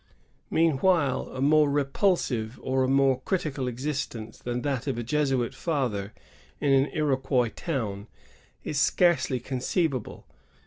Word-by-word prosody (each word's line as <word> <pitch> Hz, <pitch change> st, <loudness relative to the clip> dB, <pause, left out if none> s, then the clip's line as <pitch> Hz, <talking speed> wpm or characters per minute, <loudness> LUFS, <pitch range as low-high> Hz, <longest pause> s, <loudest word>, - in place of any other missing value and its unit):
Meanwhile 160 Hz, -2 st, +2 dB
a 130 Hz, -, -5 dB
more 150 Hz, +1 st, +4 dB
repulsive 140 Hz, -, 0 dB
or 130 Hz, 0 st, +1 dB
a -, -, +1 dB
more 135 Hz, -1 st, +3 dB
criti 165 Hz, -3 st, -1 dB
cal 135 Hz, -2 st, -3 dB
existence 125 Hz, -3 st, -4 dB
than 120 Hz, 0 st, -3 dB
that 135 Hz, -2 st, -2 dB
of 130 Hz, -4 st, -1 dB
a 120 Hz, -, -2 dB
Jesuit 135 Hz, -1 st, 0 dB
father 125 Hz, -, -2 dB, 0.5 s
in 140 Hz, -, +1 dB
an 135 Hz, +1 st, +4 dB
Iroquois 135 Hz, -5 st, +1 dB
town 110 Hz, -, -3 dB, 0.6 s
is 145 Hz, -, -2 dB
scarcely 170 Hz, -5 st, +2 dB
conceivable. 130 Hz, -, -2 dB
135 Hz, 130 wpm, -27 LUFS, 125-150 Hz, 0.6 s, more